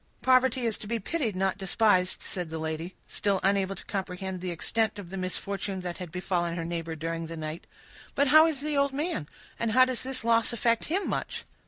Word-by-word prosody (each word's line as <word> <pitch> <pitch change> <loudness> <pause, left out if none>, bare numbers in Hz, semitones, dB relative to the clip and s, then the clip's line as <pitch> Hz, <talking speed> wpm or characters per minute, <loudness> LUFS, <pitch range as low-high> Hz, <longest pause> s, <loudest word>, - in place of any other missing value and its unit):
"Poverty 260 0 +4
is 225 -2 0
to 210 - -8
be 230 +2 0
pitied, 230 - -2
and - - -3
not 195 0 +1
despised," 190 -1 +2
said 180 -3 -2
the 160 - -4
lady, 160 +3 -4
still 200 -2 0
unable 195 0 +2
to - - -9
comprehend 190 -1 -4
the 185 - -3
extent 220 +6 0
of 190 -4 -8
the - - -5
misfortune 195 +1 -3
that 180 0 -5
had 180 -3 -6
befallen 175 -1 -1
her 165 - -2
neighbor 165 -1 -3
during 165 +1 -3
the 165 0 -6
night. 155 +1 -5 0.5
"But 280 -1 +3
how 310 +3 +8
is 300 -4 -2
the 300 0 -1
old 280 -1 +2
man? 295 - -2 0.3
And 230 -1 0
does 255 0 +4
this 260 -1 -3
loss 230 0 +3
affect 230 0 +1
him 380 +5 -1
much?" - - -3
195 Hz, 210 wpm, -28 LUFS, 175-245 Hz, 0.5 s, how